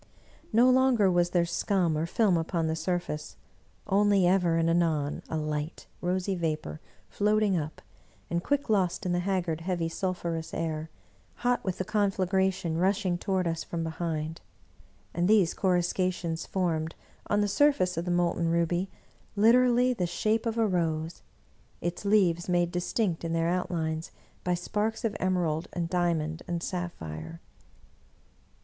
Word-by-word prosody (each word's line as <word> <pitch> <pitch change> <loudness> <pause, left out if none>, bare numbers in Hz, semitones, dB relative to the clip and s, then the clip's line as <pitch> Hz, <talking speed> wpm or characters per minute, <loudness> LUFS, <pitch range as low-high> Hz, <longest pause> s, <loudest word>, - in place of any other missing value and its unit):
No 235 +3 +5
longer 255 -6 +4
was 175 0 +2
there 175 -1 +2
scum 175 -1 +1
or 160 +2 -1
film 200 0 +2
upon 165 0 0
the 160 0 0
surface; 165 -2 -3 0.5
only 200 -1 +3
ever 175 -2 +3
and 165 0 +2
anon 160 -4 +1
a 160 - -2
light, 150 +1 -3 0.2
rosy 185 +2 0
vapor 155 - -3 0.3
floating 210 -1 +2
up, 155 -2 -4 0.4
and 170 +1 -2
quick 285 0 0
lost 190 -6 +1
in 180 - 0
the 175 - +1
haggard, 175 -3 -1
heavy, 170 -1 -1
sulphurous 170 -2 -3
air, 160 -1 -3 0.6
hot 245 0 +2
with 190 -2 -2
the 185 - -2
conflagration 190 -4 0
rushing 190 0 +1
toward 190 -1 0
us 165 -1 -2
from 165 -1 -4
behind. 160 -1 -3 0.7
And 175 +1 +1
these 205 -5 +4
coruscations 180 -2 0
formed, 165 -4 -1 0.3
on 205 0 +2
the 205 - +2
surface 200 -5 +3
of 165 +1 -2
the - - -3
molten 175 -1 +1
ruby, 170 +3 +1 0.5
literally 245 +3 +5
the 180 -7 -1
shape 215 +6 0
of 225 0 -2
a 225 - +3
rose, 165 -4 -1 0.6
its 175 +4 -4
leaves 185 -5 +3
made 175 -1 +2
distinct 180 0 -1
in 165 0 -2
their 165 0 +1
outlines 165 -3 -2 0.3
by 180 0 +1
sparks 215 +5 -2
of 220 - -1
emerald 175 -4 0
and 170 -2 -3
diamond 165 -3 0
and 175 -1 -2
sapphire. 80 - -5
175 Hz, 145 wpm, -28 LUFS, 165-195 Hz, 0.7 s, No